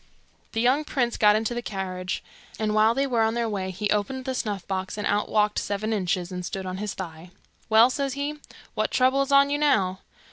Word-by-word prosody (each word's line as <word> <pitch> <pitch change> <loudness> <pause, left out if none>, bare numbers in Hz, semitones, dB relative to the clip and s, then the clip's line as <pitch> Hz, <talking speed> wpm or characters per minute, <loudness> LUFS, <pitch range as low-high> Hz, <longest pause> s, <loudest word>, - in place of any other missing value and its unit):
The 225 - 0
young 260 +5 +3
prince 245 -5 -1
got 210 -1 +5
into 220 +2 0
the 240 - -3
carriage, 185 -3 -4 0.3
and 215 -1 -1
while 215 +2 +4
they 275 +1 +1
were 245 -4 +1
on 225 +1 +2
the 235 -1 0
way 195 -3 -3
he 190 +3 -2
opened 230 +6 -1
the 260 - -2
snuff 205 -7 -3
box, 190 +1 -3
and 210 - -3
out 205 +1 0
walked 210 -1 +2
Seven 215 +2 -2
Inches, 185 -2 -1
and 180 0 -5
stood 190 +2 -5
on 185 0 -4
his 210 0 -4
thigh. 170 -2 -8 0.4
'Well,' 225 +3 +6
says 275 0 -2
he, 285 +2 -2 0.4
'what - - 0
trouble 260 +2 +3
is 275 0 -1
on 280 0 +5
you 290 - 0
now? 195 -11 +2
215 Hz, 220 wpm, -25 LUFS, 190-255 Hz, 0.4 s, Well